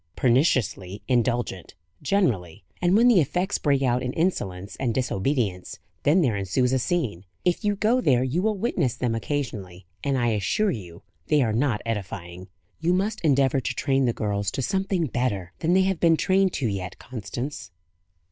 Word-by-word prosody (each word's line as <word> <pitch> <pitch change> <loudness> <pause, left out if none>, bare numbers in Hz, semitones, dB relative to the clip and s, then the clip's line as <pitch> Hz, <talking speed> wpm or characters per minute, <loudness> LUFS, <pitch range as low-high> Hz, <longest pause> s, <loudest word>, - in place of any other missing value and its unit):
"Perniciously 120 - +1
indulgent, 120 -8 -1 0.3
generally; 105 - 0 0.2
and 180 +3 +4
when 235 +2 +5
the 235 -7 +6
effects 180 +7 -1
break 140 -2 +2
out 125 -1 +2
in 125 0 -3
insolence 100 - -2
and 120 -4 -1
disobedience, 115 -5 -1 0.2
then 165 +5 +4
there 120 -7 +1
ensues 100 +7 0
a 130 - +2
scene. 125 - -1 0.2
If 180 -1 +1
you 205 -1 +1
go 225 +5 +2
there 125 - +3
you 135 +7 0
will 215 0 0
witness 175 - 0
them 120 -1 -1
occasionally, 110 -8 -4 0.2
and 140 -2 +1
I 120 -1 +1
assure 110 - +1
you 90 -4 -8 0.2
they 150 -2 +3
are 110 -3 0
not 120 -2 0
edifying. 95 -5 -5 0.3
You 170 +2 +1
must 205 +4 -1
endeavour 135 -3 +3
to 125 -1 -3
train 135 -1 +1
the 120 - +2
girls 100 -3 -2
to 135 - -2
something 190 -1 0
better 105 - -2
than 165 +2 +1
they 190 +1 +5
have 190 -2 0
been 165 -2 +4
trained 190 +1 +2
to 130 - -1
yet, 95 -3 -4
Constance." 120 0 -6
130 Hz, 175 wpm, -25 LUFS, 105-170 Hz, 0.3 s, the